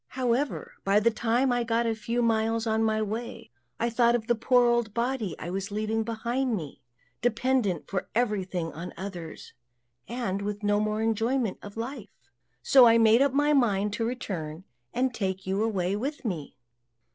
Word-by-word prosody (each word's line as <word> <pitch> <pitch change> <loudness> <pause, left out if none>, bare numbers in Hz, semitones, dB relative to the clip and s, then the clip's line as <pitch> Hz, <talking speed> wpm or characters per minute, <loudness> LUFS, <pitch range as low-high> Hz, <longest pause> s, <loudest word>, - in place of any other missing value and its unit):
However, 255 +2 -1
by 200 +1 +4
the 230 +2 +3
time 240 +3 +1
I 245 - +2
had 235 - -2
got 230 +1 +1
a 225 - +1
few 230 +2 -2
miles 225 0 +1
on 220 0 +1
my 220 0 +1
way, 220 - -5 0.3
I 235 0 0
thought 235 0 +4
of 230 -2 -2
the 240 - +3
poor 245 +2 +3
old 235 -3 +1
body 235 - -1
I 175 - -6
was 195 +2 -3
leaving 215 +2 -1
behind 235 +3 -1
me, 155 -9 -7 0.4
dependent 240 - +1
for 190 -2 -3
everything 190 -8 -1
on 170 +3 -7
others, 180 -4 -7 0.5
and 220 -5 -2
with 205 +1 -4
no 205 0 +2
more 215 +1 -1
enjoyment 225 0 0
of 205 +1 -10
life. 225 - -8 0.3
So 255 - +7
I 230 0 +6
made 225 +2 +5
up 280 -1 +4
my 290 +1 +3
mind 210 -6 +2
to 230 - -2
return, 185 -9 -4 0.3
and 255 0 0
take 190 -3 -3
you 190 +2 0
away 195 -4 0
with 275 +6 -4
me." 165 - -4
225 Hz, 180 wpm, -27 LUFS, 200-240 Hz, 0.5 s, So